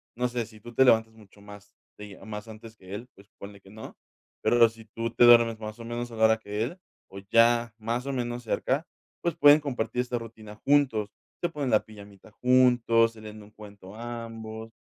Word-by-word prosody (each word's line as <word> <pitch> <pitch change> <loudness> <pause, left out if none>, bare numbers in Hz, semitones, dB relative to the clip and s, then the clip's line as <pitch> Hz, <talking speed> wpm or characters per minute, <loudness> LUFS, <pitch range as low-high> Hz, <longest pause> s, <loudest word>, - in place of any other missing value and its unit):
No 125 +1 0
sé, 120 -2 -3
si 110 -1 -16
tú 120 +2 -12
te 130 - +4
levantas 110 -2 +3
mucho 105 -2 -19
más 105 0 -14 0.2
días 105 -2 -11
más 105 0 -7
antes 110 +1 -12
que 95 0 -9
él, 120 +4 -8
pues, 100 +2 -19
ponle 100 0 -11
que 95 - -18
no, 110 +2 -11 0.5
pero 120 -1 +5
si 115 0 -15
tú 115 +1 -5
te 120 - +3
duermes, 115 -2 +6
más 110 0 -7
o 115 - -9
menos, 120 0 -5
a - - -9
la 110 0 +3
hora 110 0 +4
que 105 0 -4
él, 130 +10 -5 0.3
o 100 +1 -9
ya, 115 0 +4
más 115 +3 -3
o 140 - -2
menos, 120 -1 -4
cerca, 135 +7 -1 0.4
pues, 170 -2 -1
pueden 145 -1 +7
compartir 125 -4 -2
esta 125 -1 -3
rutina 110 -2 -10
juntos. 120 -5 +1 0.3
Se 175 - 0
ponen 145 -5 -3
la 110 - +3
pijamita 100 -1 -15
juntos, 120 -2 +3
se 110 - -14
leen 110 0 -10
un 105 - -17
cuento 105 -2 -13
ambos. 115 -1 -8
115 Hz, 210 wpm, -27 LUFS, 105-120 Hz, 0.5 s, pueden